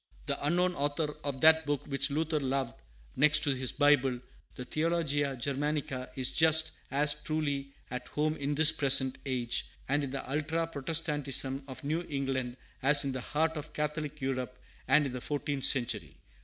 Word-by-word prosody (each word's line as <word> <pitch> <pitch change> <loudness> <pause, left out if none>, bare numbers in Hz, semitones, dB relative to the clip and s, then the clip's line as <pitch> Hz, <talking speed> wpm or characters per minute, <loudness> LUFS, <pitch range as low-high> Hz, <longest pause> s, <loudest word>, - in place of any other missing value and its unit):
The - - -3
unknown 180 +4 +1
author 145 0 -1
of 140 -2 -4
that 160 -1 +5
book 145 -1 -1
which 140 0 0
Luther 155 +2 0
loved 135 -3 -1 0.4
next 150 +2 +3
to 145 - +3
his 130 -1 -1
Bible, 140 -4 +3 0.4
the 125 - -7
Theologia 155 -3 0
Germanica, 140 0 -2
is 130 -1 0
just 160 0 +3 0.2
as 145 +1 +3
truly 140 -3 -3 0.2
at 125 0 -5
home 155 +1 -1
in 145 +1 -2
this 155 +1 +8
present 135 -3 +3
age, 125 -3 -1 0.2
and 145 +2 +1
in 140 - -3
the 135 +1 -5
ultra 155 +4 -1
Protestantism 145 -3 -1
of 130 +1 -8
New 155 +4 -1
England, 135 -3 -2 0.2
as 140 +2 +6
in 135 - -1
the 130 -1 -4
heart 160 +4 -1
of 150 0 -7
Catholic 150 0 -3
Europe, 130 -1 -3 0.3
and 145 +3 +4
in 135 - -3
the 125 0 -6
fourteenth 145 -1 -2
century. 115 - 0
145 Hz, 170 wpm, -30 LUFS, 130-150 Hz, 0.4 s, this